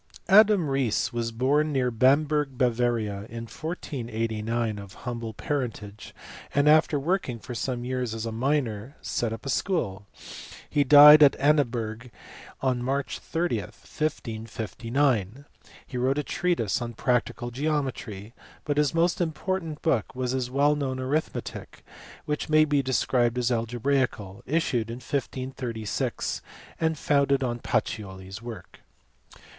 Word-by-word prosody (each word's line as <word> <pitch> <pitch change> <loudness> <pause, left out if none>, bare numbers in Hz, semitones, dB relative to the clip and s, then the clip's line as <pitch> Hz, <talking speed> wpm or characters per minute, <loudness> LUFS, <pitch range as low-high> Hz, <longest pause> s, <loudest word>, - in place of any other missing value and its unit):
Adam 205 -2 +6
Riese^ 130 -2 0
was 115 -1 -2
born 140 +6 +1
near 130 -3 +1
Bamberg, 140 +3 +2
Bavaria, 115 -5 0
in 115 0 -6
1489 115 -6 -3
of 100 -1 -11
humble 115 -2 -4
parentage, 115 -8 -4 0.4
and 145 +1 +3
after 155 -1 +5
working 160 -5 -1
for 120 +3 -8
some 120 +1 -3
years 125 -3 -2
as 110 0 -4
a 115 - -3
miner 125 0 -1
set 120 -2 -1
up 115 +3 -7
a - - -3
school; 105 - -1 0.6
he 145 -1 +2
died 150 +2 +10
at 145 -2 +7
Annaberg 125 -5 0 0.5
on 130 -2 0
March 135 +2 -2
30, 170 +1 -1
1559. 115 - -2 0.4
He 125 - -6
wrote 130 +3 +1
a 150 - 0
treatise 155 - 0
on 120 0 -4
practical 120 +1 -1
geometry, 125 -7 -3 0.3
but 145 -1 -1
his 150 0 +2
most 170 +2 +2
important 165 -1 -3
book 130 -8 0
was 125 -1 -1
his 130 -1 -1
well 140 +3 +3
known 135 -3 -2
arithmetic 140 +5 -4 0.4
(which 150 +1 -3
may 155 0 +5
be 145 -2 +2
described 125 -2 +1
as 125 0 +1
algebraical) 120 -4 -1
issued 125 -7 0
in 115 - -4
1536 130 -4 -3 0.4
and 160 -1 +1
founded 140 -1 +2
on 120 -1 -2
Pacioli 95 -5 -3
s 100 +3 -8
work. 115 -2 -9
130 Hz, 130 wpm, -26 LUFS, 115-145 Hz, 0.6 s, died